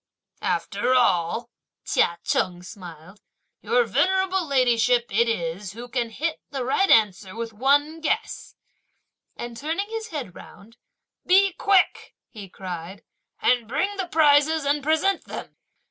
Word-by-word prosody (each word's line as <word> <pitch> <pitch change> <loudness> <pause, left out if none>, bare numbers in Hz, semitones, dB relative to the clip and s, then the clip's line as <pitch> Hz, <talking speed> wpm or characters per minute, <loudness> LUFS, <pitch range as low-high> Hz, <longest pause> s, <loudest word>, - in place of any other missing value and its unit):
"After 255 - 0
all," 230 0 +1 0.3
Chia 170 - +1
Cheng 180 -1 -1
smiled; 180 +1 -12 0.4
"Your 480 +1 +2
venerable 380 -4 +1
ladyship 245 -3 +3
it 235 +3 +2
is 175 -1 -3
who 235 +3 -9
can 240 -1 -2
hit 310 +8 -3
the 270 -3 -4
right 385 +10 +1
answer 200 -3 +3
with 230 -1 -5
one 290 +7 +2
guess!" 325 +8 -3 0.8
and 240 0 -7
turning 325 - -3
his 450 -1 -4
head 280 - -6
round, 230 +5 -15 0.5
"Be 390 +1 +5
quick," 390 0 +1 0.2
he 205 -5 -10
cried, 180 0 -8 0.4
"and 245 -3 +2
bring 390 - -1
the 380 -2 -2
prizes 310 -1 +3
and 290 +1 +1
present 320 +6 +1
them!" - - -8
250 Hz, 130 wpm, -24 LUFS, 210-320 Hz, 0.8 s, Be